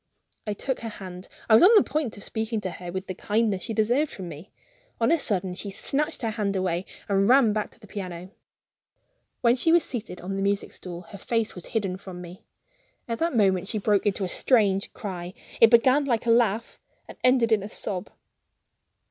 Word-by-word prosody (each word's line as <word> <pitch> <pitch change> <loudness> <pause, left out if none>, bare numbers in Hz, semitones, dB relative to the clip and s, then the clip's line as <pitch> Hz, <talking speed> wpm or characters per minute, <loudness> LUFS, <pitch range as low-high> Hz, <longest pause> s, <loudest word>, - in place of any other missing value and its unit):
I 210 - 0
took 260 +5 -2
her 230 - -5
hand; 185 -3 -9 0.2
I 225 - +4
was 220 - +8
on 415 +6 +8
the 415 - +7
point 295 -9 -2
of 205 - -8
speaking 220 0 -2
to 185 - -3
her 175 0 -8
with 190 +1 -4
the 185 - -5
kindness 210 0 0
she 225 - -3
deserved 245 +8 +2
from 185 -3 -7
me. 165 +6 -10 0.5
On 230 +5 +3
a 335 - +5
sudden 190 -7 0
she 200 +3 -5
snatched 285 +9 -2
her 225 - 0
hand 210 -2 -2
away 185 -1 -1 0.2
and 195 +1 +2
ran 250 -4 +5
back 215 0 -2
to - - -19
the 225 - -14
piano. 185 -3 -7 1.1
When 235 0 +4
she 295 +6 +2
was 340 0 +5
seated 215 -7 -5
on 195 +2 -4
the - - -2
music 200 +1 0
stool, 175 -1 -8
her 200 - -10
face 225 +1 -1
was 180 - -9
hidden 195 -5 -2
from 185 -2 -9
me. 180 +1 -10 0.7
At 230 -1 -3
that 335 -4 0
moment 190 -3 +2
she 215 - -2
broke 205 0 +1
into 200 0 0
a - - 0
strange 200 -1 +2
cry 185 -5 -6 0.2
it 230 - +8
began 255 +5 +5
like 240 -3 0
a 230 - +3
laugh, 230 -1 +1 0.3
and - - -10
it - - -38
ended 250 -2 +4
like 215 -2 +4
a 200 - -5
sob. 195 -2 -4
210 Hz, 215 wpm, -26 LUFS, 190-235 Hz, 1.1 s, was